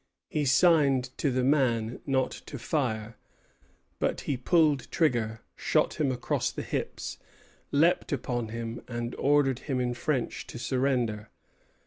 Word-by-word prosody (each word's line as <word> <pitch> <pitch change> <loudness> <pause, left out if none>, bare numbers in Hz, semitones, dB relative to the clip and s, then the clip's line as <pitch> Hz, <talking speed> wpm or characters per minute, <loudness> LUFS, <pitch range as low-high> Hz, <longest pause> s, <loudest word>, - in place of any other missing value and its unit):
He 150 -1 0
signed 135 -3 +4
to 145 - +2
the 130 -1 0
man 125 -5 +2
not 130 -1 +1 0.2
to 140 - -6
fire; 115 -5 -2 0.8
but - - 0
he 140 - -1
pulled 150 +1 +2
trigger, 115 -8 +1
shot - - +1
him 140 -3 +2
across 125 -1 -1
the - - -5
hips, - - -4 0.5
leaped 165 +5 +3
upon 120 -4 -2
him, 115 +1 -5
and 120 0 -4
ordered 140 -2 +3
him 130 -2 +1
in 125 -1 0
French 125 0 -2
to - - -8
surrender. 120 -5 0
130 Hz, 135 wpm, -28 LUFS, 120-140 Hz, 0.8 s, signed